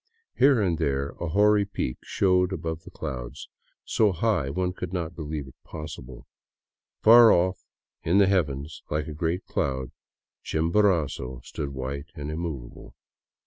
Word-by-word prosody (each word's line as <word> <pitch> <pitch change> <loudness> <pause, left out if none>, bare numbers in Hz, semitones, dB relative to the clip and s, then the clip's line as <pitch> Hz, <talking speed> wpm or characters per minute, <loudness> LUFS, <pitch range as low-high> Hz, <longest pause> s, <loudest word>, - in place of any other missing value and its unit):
Here 135 -2 +5
and 90 -6 +1
there 70 0 0
a 85 - -3
hoary 105 +4 +4
peak 95 -10 -4
showed 90 -1 +2
above 80 -3 -4
the - - -9
clouds, 60 -6 -6 0.4
so 110 -3 +3
high 90 -6 0
one 90 +5 -1
could 90 -1 -6
not 85 -3 -3
believe 75 -3 -5
it 65 - -13
possible. 75 -5 -9 0.8
Far 115 0 +9
off 90 +1 +2 0.4
in 85 +4 +2
the 100 - +7
heavens 75 -6 -1
like 75 0 -1
a 80 - -5
great 85 +4 -2
cloud, 65 -2 -2 0.5
Chimborazo 80 -7 +1
stood 70 - -5
white 70 +2 -5
and 75 +1 -5
immovable. 75 -7 -6
80 Hz, 145 wpm, -26 LUFS, 70-95 Hz, 0.8 s, Far